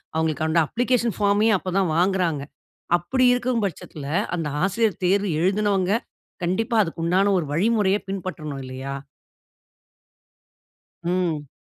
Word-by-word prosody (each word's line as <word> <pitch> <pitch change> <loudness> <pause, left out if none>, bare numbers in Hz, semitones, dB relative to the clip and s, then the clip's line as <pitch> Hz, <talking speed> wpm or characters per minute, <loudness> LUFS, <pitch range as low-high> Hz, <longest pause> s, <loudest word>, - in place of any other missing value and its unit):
அவங்களுக்கு 160 -1 0
அந்த 160 +1 +3
அப்ளிகேஷன் 240 -1 0
ஃபார்மே 205 +2 +3
அப்ப 185 0 -5
தான் 190 -3 +2
வாங்குறாங்க. 175 -4 +1 0.6
அப்டி 255 +10 +1
இருக்கும் 245 -2 0
பட்சத்தில 155 -5 -6 0.3
அந்த 165 -3 -2 0.2
ஆசிரியர் 200 +1 +1
தேர்வு 200 +2 +2
எழுதினவங்க, 195 0 +1 0.5
கண்டிப்பா 225 +7 0
அதுக்கு 165 -2 -6
உண்டான 190 +4 +3
ஒரு 165 - -3
வழிமுறைய 205 +2 +2
பின்பற்றணும், 165 -7 -5
இல்லயா? 130 +2 -5 2.1
ம். 170 -4 -1
185 Hz, 115 wpm, -23 LUFS, 165-205 Hz, 2.1 s, அந்த